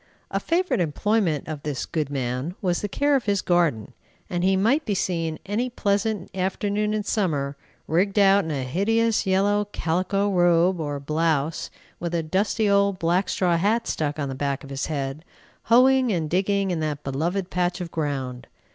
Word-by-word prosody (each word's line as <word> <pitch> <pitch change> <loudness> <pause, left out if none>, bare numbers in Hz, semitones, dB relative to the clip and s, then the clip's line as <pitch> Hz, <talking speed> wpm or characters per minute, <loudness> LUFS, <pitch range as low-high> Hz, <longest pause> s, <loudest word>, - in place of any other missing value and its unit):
A - - 0
favorite 355 - 0
employment 175 0 0
of 155 -2 -5
this 145 -3 -3
good 155 -4 -2
man 130 +4 -3
was 180 -3 0
the 205 - -3
care 285 +7 +2
of 265 - 0
his 200 -2 +1
garden, 170 - +1 0.4
and 175 0 -1
he 190 +1 +3
might 240 +11 +2
be 210 -6 -1
seen 165 -4 -1
any 220 +6 -1
pleasant 205 -4 -1
afternoon 205 +3 -1
in 210 - -1
summer, 150 -11 -1 0.3
rigged 190 +5 +1
out 200 0 +5
in 160 - -5
a 140 -4 -2
hideous 215 - +1
yellow 205 +2 +2
calico 190 +2 -1
robe, 175 -1 +3
or 145 -2 -3
blouse, 155 +1 -1 0.3
with 170 0 -3
a 165 - 0
dusty 205 +6 0
old 200 -1 +3
black 180 +2 +1
straw 175 -2 +1
hat 215 +6 +1
stuck 150 -1 -2
on 145 -2 -2
the 135 - -4
back 140 0 -2
of 140 - -10
his 135 0 -3
head, 140 0 -3 0.4
hoeing 255 +1 +5
and 160 -5 -1
digging 195 +1 +1
in 170 - -1
that 150 -2 -3
beloved 170 +8 -2
patch 180 0 0
of 175 -2 -5
ground. 135 -5 -3
180 Hz, 180 wpm, -24 LUFS, 155-205 Hz, 0.4 s, out